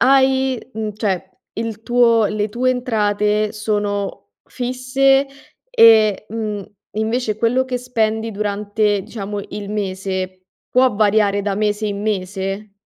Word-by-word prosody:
hai 265 Hz, 0 st, +3 dB
mhmm, 215 Hz, -1 st, -3 dB
cioè, 190 Hz, -3 st, -2 dB, 0.2 s
il 225 Hz, 0 st, -5 dB
tuo 235 Hz, -2 st, +4 dB
le 210 Hz, +1 st, -1 dB
tue 250 Hz, +4 st, +1 dB
entrate 210 Hz, -4 st, 0 dB
sono 205 Hz, -, -2 dB, 0.2 s
fisse 255 Hz, +2 st, +1 dB, 0.4 s
e, 220 Hz, -, +5 dB
mhmm, 215 Hz, -3 st, -4 dB, 0.3 s
invece 220 Hz, +1 st, -1 dB
quello 245 Hz, +3 st, +1 dB
che 255 Hz, -1 st, -2 dB
spendi 225 Hz, -2 st, -1 dB
durante 205 Hz, 0 st, 0 dB
diciamo 205 Hz, -1 st, -5 dB
il 205 Hz, -1 st, -6 dB
mese 190 Hz, -2 st, -3 dB, 0.3 s
può 255 Hz, -2 st, +3 dB
variare 205 Hz, -1 st, +2 dB
da 200 Hz, -1 st, -1 dB
mese 210 Hz, +1 st, 0 dB
in 200 Hz, -1 st, -3 dB
mese? 195 Hz, 0 st, -3 dB
215 Hz, 120 wpm, -19 LUFS, 205-235 Hz, 0.4 s, e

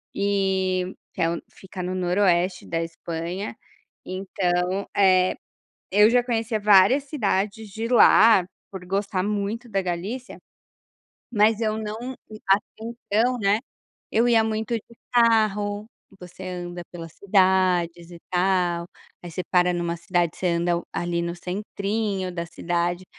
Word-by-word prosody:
Eh, 190 Hz, -2 st, 0 dB, 0.2 s
que 180 Hz, -, -4 dB
é 165 Hz, -, +3 dB
o 170 Hz, -, -3 dB
que -, -, -42 dB
fica 190 Hz, -1 st, -8 dB
no 180 Hz, +1 st, -3 dB
noroeste 180 Hz, 0 st, +1 dB
da 165 Hz, 0 st, -2 dB
Espanha, 170 Hz, +4 st, -5 dB, 0.5 s
então, 185 Hz, 0 st, -1 dB
eh, 185 Hz, -2 st, +4 dB, 0.6 s
eu 210 Hz, +2 st, +6 dB
já 245 Hz, 0 st, +4 dB
conhecia 225 Hz, -2 st, -1 dB
várias 210 Hz, +7 st, +5 dB
cidades 215 Hz, -6 st, -1 dB
de 225 Hz, +3 st, -4 dB
lá 220 Hz, -5 st, +6 dB, 0.2 s
por 190 Hz, -2 st, -8 dB
gostar 195 Hz, 0 st, -1 dB
muito 210 Hz, +4 st, -2 dB
da 195 Hz, -2 st, 0 dB
Galícia, 195 Hz, +9 st, -4 dB, 0.9 s
mas 215 Hz, 0 st, +3 dB
eu 215 Hz, -1 st, 0 dB
não 220 Hz, +4 st, -5 dB, 0.3 s
até 200 Hz, +2 st, +1 dB
então, 235 Hz, +1 st, -1 dB
né, 200 Hz, +1 st, +2 dB, 0.5 s
eu 230 Hz, +2 st, +3 dB
ia 230 Hz, -2 st, +5 dB
muito 220 Hz, +2 st, -2 dB
de 230 Hz, +1 st, -6 dB, 0.2 s
carro, 215 Hz, -3 st, +2 dB, 0.3 s
você 180 Hz, +1 st, -11 dB
anda 175 Hz, -1 st, -6 dB
pelas 165 Hz, -2 st, -9 dB
cidades 185 Hz, -3 st, +2 dB
e 170 Hz, -, -10 dB
tal, 180 Hz, -2 st, +1 dB, 0.4 s
aí 175 Hz, -, -8 dB
você 165 Hz, -, -5 dB
para 180 Hz, -1 st, +4 dB
numa 170 Hz, -1 st, -2 dB
cidade, 175 Hz, -1 st, -1 dB
você 185 Hz, -, -2 dB
anda 170 Hz, 0 st, +1 dB
ali, 175 Hz, 0 st, -1 dB
no 170 Hz, 0 st, -3 dB
centrinho 200 Hz, +1 st, -3 dB
da 170 Hz, -1 st, -4 dB
cidade. 175 Hz, +1 st, -2 dB
190 Hz, 135 wpm, -24 LUFS, 175-215 Hz, 0.9 s, eu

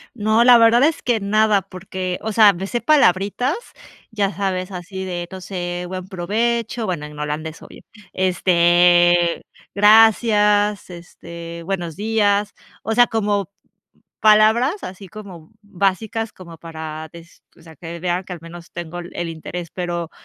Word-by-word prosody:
No, 220 Hz, +1 st, +2 dB
la 245 Hz, -1 st, +8 dB
verdad 230 Hz, +2 st, +5 dB
es 315 Hz, +1 st, +1 dB
que 240 Hz, -3 st, +1 dB
nada, 210 Hz, 0 st, +2 dB
porque, 185 Hz, -1 st, -6 dB
o 220 Hz, -, -3 dB
sea, 210 Hz, -2 st, +6 dB
me 190 Hz, +3 st, -6 dB
sé 240 Hz, +2 st, -3 dB
palabritas, 250 Hz, -, +2 dB, 0.6 s
ya 200 Hz, -2 st, -1 dB
sabes, 185 Hz, 0 st, -3 dB
así 190 Hz, +1 st, -7 dB
de 175 Hz, -1 st, -5 dB
no 190 Hz, -, -7 dB
sé, 180 Hz, -1 st, -5 dB
"Buen 185 Hz, 0 st, -6 dB
provecho", 225 Hz, +5 st, -2 dB
bueno, 170 Hz, -6 st, -3 dB
en 150 Hz, 0 st, -11 dB
holandés 150 Hz, +2 st, -5 dB
obvio, -, -, -14 dB, 0.3 s
este, 175 Hz, -1 st, +3 dB, 0.3 s
"Gracias", 210 Hz, -1 st, +4 dB
este, 170 Hz, -1 st, -10 dB
"Buenos 175 Hz, -3 st, -4 dB
días", 205 Hz, -1 st, 0 dB, 0.3 s
o 225 Hz, -, -2 dB
sea, 245 Hz, 0 st, +6 dB
como 205 Hz, -4 st, -1 dB, 0.7 s
palabras, 220 Hz, -, +4 dB
así 190 Hz, +1 st, -9 dB
como 180 Hz, -4 st, -12 dB
básicas, 205 Hz, +3 st, -2 dB
como 170 Hz, -3 st, -13 dB
para 160 Hz, -1 st, -8 dB
des 170 Hz, 0 st, -15 dB
o -, -, -20 dB
sea, 160 Hz, -1 st, -15 dB
que 170 Hz, 0 st, -8 dB
vean 180 Hz, +1 st, -2 dB
que 185 Hz, -, -9 dB
al 175 Hz, -, -8 dB
menos 170 Hz, 0 st, -12 dB
tengo 175 Hz, 0 st, -7 dB
el 175 Hz, 0 st, -8 dB
el 175 Hz, -, -4 dB
interés, 165 Hz, +1 st, -7 dB
pero, 175 Hz, -2 st, -4 dB
185 Hz, 150 wpm, -20 LUFS, 175-215 Hz, 0.7 s, la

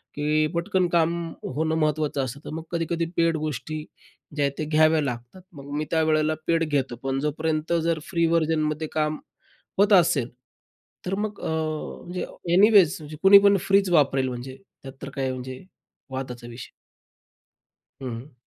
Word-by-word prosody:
की 155 Hz, +1 st, +1 dB
पटकन 180 Hz, +1 st, +1 dB
काम 170 Hz, 0 st, +2 dB, 0.3 s
होणं 160 Hz, +4 st, -1 dB
महत्त्वाचं 150 Hz, -3 st, 0 dB
असतं 130 Hz, +3 st, -7 dB
तर -, -, -6 dB
मग 160 Hz, -, -5 dB
कधी-कधी 165 Hz, 0 st, -1 dB
पेड 165 Hz, -1 st, +3 dB
गोष्टी 155 Hz, +1 st, -4 dB, 0.5 s
ज्या 145 Hz, -1 st, +1 dB
आहेत 140 Hz, -, 0 dB
त्या 155 Hz, -, -2 dB
घ्याव्या 155 Hz, 0 st, +4 dB
लागतात. 125 Hz, +6 st, -5 dB
मग 140 Hz, -1 st, -10 dB
मी 155 Hz, -, -1 dB
त्यावेळेला 155 Hz, -1 st, +2 dB
पेड 165 Hz, -1 st, +2 dB
घेतो 135 Hz, -4 st, 0 dB
पण 135 Hz, 0 st, -1 dB
जोपर्यंत 155 Hz, +2 st, -1 dB
जर 165 Hz, -1 st, 0 dB
फ्री 170 Hz, -3 st, +1 dB
व्हर्जनमध्ये 155 Hz, -1 st, 0 dB
काम 155 Hz, 0 st, 0 dB, 0.6 s
होत 205 Hz, +1 st, +5 dB
असेल, 165 Hz, -9 st, +4 dB, 0.8 s
तर 190 Hz, +2 st, -1 dB
मग 210 Hz, 0 st, -4 dB
अ, -, -, -3 dB, 0.6 s
म्हणजे 180 Hz, +1 st, -4 dB, 0.3 s
एनीवेज 200 Hz, -3 st, +6 dB
म्हणजे 150 Hz, 0 st, -9 dB
कोणी 200 Hz, +1 st, +10 dB
पण 200 Hz, 0 st, +5 dB
फ्रीच 195 Hz, -1 st, +4 dB
वापरेल, 135 Hz, -4 st, +3 dB
म्हणजे 125 Hz, +2 st, -7 dB, 0.3 s
त्यात 135 Hz, -1 st, -8 dB
तर 140 Hz, -, -5 dB
काय 135 Hz, -1 st, -1 dB
म्हणजे 130 Hz, +2 st, -7 dB, 0.5 s
वादाचा 125 Hz, -2 st, -6 dB
विषय. 120 Hz, 0 st, -9 dB, 1.3 s
हं, 130 Hz, -, -3 dB
हं. 130 Hz, -1 st, -16 dB
155 Hz, 155 wpm, -25 LUFS, 140-170 Hz, 1.3 s, कोणी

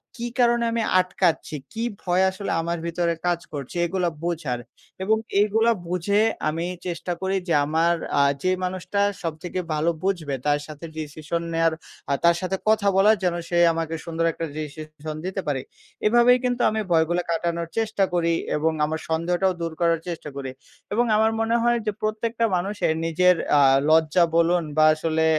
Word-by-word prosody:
"কী 240 Hz, -1 st, -4 dB
কারণে 240 Hz, -1 st, +3 dB
আমি 230 Hz, 0 st, 0 dB, 0.2 s
আটকাচ্ছি? 180 Hz, -4 st, 0 dB, 0.2 s
কী 225 Hz, +1 st, -3 dB, 0.2 s
ভয় 180 Hz, +1 st, +2 dB
আসলে 195 Hz, +1 st, -5 dB
আমার 170 Hz, +1 st, -2 dB
ভিতরে 170 Hz, 0 st, 0 dB
কাজ 175 Hz, -1 st, +1 dB
করছে?" 140 Hz, 0 st, -6 dB
এগুলা 180 Hz, 0 st, 0 dB
বোঝার 155 Hz, -8 st, -2 dB, 0.4 s
এবং 220 Hz, +3 st, +3 dB, 0.2 s
এগুলা 225 Hz, +3 st, +3 dB, 0.2 s
বুঝে 180 Hz, +4 st, +1 dB, 0.3 s
আমি 165 Hz, +2 st, -2 dB, 0.2 s
চেষ্টা 175 Hz, +1 st, -4 dB
করি 190 Hz, +1 st, 0 dB
যে 170 Hz, -, +1 dB
আমার 165 Hz, +3 st, +2 dB, 0.3 s
আ -, -, +6 dB, 0.2 s
যে 185 Hz, -, +2 dB
মানুষটা 185 Hz, +2 st, -3 dB, 0.2 s
সবথেকে 165 Hz, +3 st, -4 dB
ভালো 155 Hz, +2 st, +1 dB
বুঝবে 165 Hz, -8 st, -1 dB
তার 145 Hz, 0 st, +2 dB
সাথে 155 Hz, +2 st, -9 dB
ডিসিশন 155 Hz, +2 st, -4 dB
নেয়ার, 165 Hz, 0 st, +2 dB, 0.4 s
আ -, -, +3 dB
তার 170 Hz, 0 st, +5 dB
সাথে 190 Hz, +1 st, -1 dB
কথা 215 Hz, -2 st, +3 dB
বলার 210 Hz, +3 st, +5 dB
যেন 175 Hz, -1 st, +1 dB
সে 175 Hz, -, 0 dB, 0.2 s
আমাকে 165 Hz, 0 st, -3 dB
সুন্দর 165 Hz, 0 st, -1 dB
একটা 165 Hz, -, -4 dB
ডিসিশন 155 Hz, 0 st, -7 dB
দিতে 190 Hz, +1 st, -3 dB
পারে। 135 Hz, -3 st, 0 dB, 0.4 s
এভাবেই 240 Hz, +3 st, +5 dB
কিন্তু 245 Hz, 0 st, 0 dB
আমি 220 Hz, 0 st, -1 dB
ভয়গুলা 170 Hz, +2 st, +2 dB
কাটানোর 170 Hz, 0 st, -1 dB
চেষ্টা 215 Hz, -3 st, +1 dB
করি 170 Hz, -1 st, +2 dB, 0.2 s
এবং 160 Hz, +2 st, +1 dB
আমার 160 Hz, +1 st, -3 dB
সন্দেহটাও 175 Hz, +3 st, +1 dB
দূর 165 Hz, -1 st, -2 dB
করার 165 Hz, -1 st, +3 dB
চেষ্টা 165 Hz, -3 st, -5 dB
করি। 135 Hz, -1 st, -5 dB, 0.4 s
এবং 240 Hz, +3 st, +2 dB
আমার 220 Hz, +1 st, +3 dB
মনে 225 Hz, +1 st, +1 dB
হয় 240 Hz, 0 st, +3 dB
যে 210 Hz, -, +1 dB
প্রত্যেকটা 225 Hz, +2 st, -1 dB
মানুষের 190 Hz, -2 st, 0 dB
নিজের 180 Hz, +2 st, +4 dB, 0.2 s
আ -, -, +6 dB, 0.3 s
লজ্জা 160 Hz, +2 st, +4 dB
বলুন 170 Hz, +1 st, +4 dB, 0.2 s
বা 155 Hz, -, +6 dB
আসলে 160 Hz, 0 st, 0 dB
175 Hz, 170 wpm, -24 LUFS, 160-200 Hz, 0.4 s, আ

